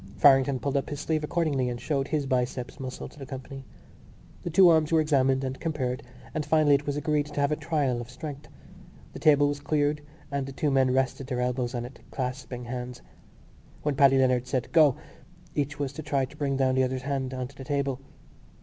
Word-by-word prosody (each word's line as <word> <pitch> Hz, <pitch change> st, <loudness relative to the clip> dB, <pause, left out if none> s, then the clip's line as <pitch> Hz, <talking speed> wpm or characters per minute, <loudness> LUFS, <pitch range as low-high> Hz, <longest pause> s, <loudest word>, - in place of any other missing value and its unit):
Farrington 135 Hz, -1 st, +5 dB
pulled 140 Hz, +2 st, -1 dB
up 135 Hz, -, -2 dB
his 145 Hz, -, -4 dB
sleeve 155 Hz, 0 st, -1 dB
accordingly 150 Hz, -5 st, 0 dB
and 120 Hz, -1 st, -4 dB
showed 140 Hz, -1 st, -1 dB
his 150 Hz, -2 st, -1 dB
biceps 125 Hz, 0 st, -2 dB
muscle 130 Hz, -1 st, -6 dB
to -, -, -16 dB
the 135 Hz, -, -6 dB
company. 135 Hz, 0 st, -8 dB, 0.8 s
The -, -, -4 dB
two 180 Hz, +3 st, +7 dB
arms 160 Hz, -2 st, +4 dB
were 165 Hz, -, +5 dB
examined 135 Hz, -3 st, +2 dB
and 130 Hz, 0 st, -4 dB
compared 140 Hz, -5 st, -2 dB, 0.3 s
and 155 Hz, -1 st, -1 dB
finally 150 Hz, -1 st, +4 dB
it 140 Hz, +1 st, +1 dB
was 145 Hz, 0 st, -1 dB
agreed 150 Hz, 0 st, 0 dB
to 145 Hz, -1 st, -5 dB
have 140 Hz, +1 st, +2 dB
a -, -, +2 dB
trial 145 Hz, -6 st, 0 dB
of 120 Hz, -, -9 dB
strength. 145 Hz, +2 st, -8 dB, 0.7 s
The -, -, -7 dB
table 145 Hz, -1 st, +5 dB
was 145 Hz, 0 st, -2 dB
cleared 145 Hz, 0 st, 0 dB, 0.3 s
and 140 Hz, -1 st, -2 dB
the 135 Hz, -, -7 dB
two 145 Hz, +2 st, 0 dB
men 130 Hz, -1 st, +3 dB
rested 130 Hz, 0 st, 0 dB
their 125 Hz, -2 st, -2 dB
elbows 125 Hz, 0 st, -1 dB
on 120 Hz, 0 st, -2 dB
it, 125 Hz, -, -11 dB
clasping 125 Hz, -1 st, -4 dB
hands. 125 Hz, 0 st, -6 dB, 0.8 s
When 150 Hz, -, +1 dB
Paddy 135 Hz, 0 st, +5 dB
Leonard 125 Hz, -1 st, +2 dB
said 130 Hz, -2 st, -2 dB
"Go!" 155 Hz, -5 st, +6 dB, 0.6 s
each 145 Hz, 0 st, -2 dB
was 140 Hz, -2 st, -3 dB
to 155 Hz, -, -6 dB
try 140 Hz, -3 st, 0 dB
to 135 Hz, -, -15 dB
bring 140 Hz, -3 st, -1 dB
down 130 Hz, -1 st, +2 dB
the 130 Hz, 0 st, +3 dB
other's 130 Hz, 0 st, -2 dB
hand 135 Hz, -2 st, -2 dB
on 130 Hz, -1 st, -3 dB
to 140 Hz, -, -17 dB
the 135 Hz, -, -9 dB
table. 140 Hz, -1 st, -1 dB
140 Hz, 215 wpm, -27 LUFS, 130-150 Hz, 0.8 s, two